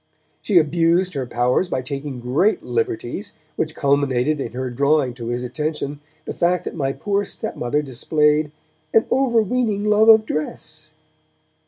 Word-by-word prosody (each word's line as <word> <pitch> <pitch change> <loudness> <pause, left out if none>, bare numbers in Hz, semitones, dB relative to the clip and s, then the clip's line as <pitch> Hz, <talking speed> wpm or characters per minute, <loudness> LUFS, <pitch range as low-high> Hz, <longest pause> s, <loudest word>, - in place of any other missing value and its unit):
She 200 - +2
abused 170 +3 +2
her 135 -3 -3
powers 125 +9 +1
by 130 - -2
taking 135 0 -5
great 135 - +1
liberties, 120 - -3 0.2
which 155 - -2
culminated 140 0 +1
in 115 - -5
her 130 0 -4
drawing 140 0 +1
his 120 0 -4
attention 150 +2 -3
to - - -29 0.2
the - - -4
fact 175 +1 +1
that - - -5
my 135 -4 -1
poor 200 +7 -1
stepmother 150 -6 -3
displayed 150 +3 +1 0.4
'an 225 - +5
overweening 235 -4 +1
love 210 +1 +4
of 220 -1 +7
dress'. 155 -6 -5
150 Hz, 145 wpm, -21 LUFS, 130-185 Hz, 0.4 s, of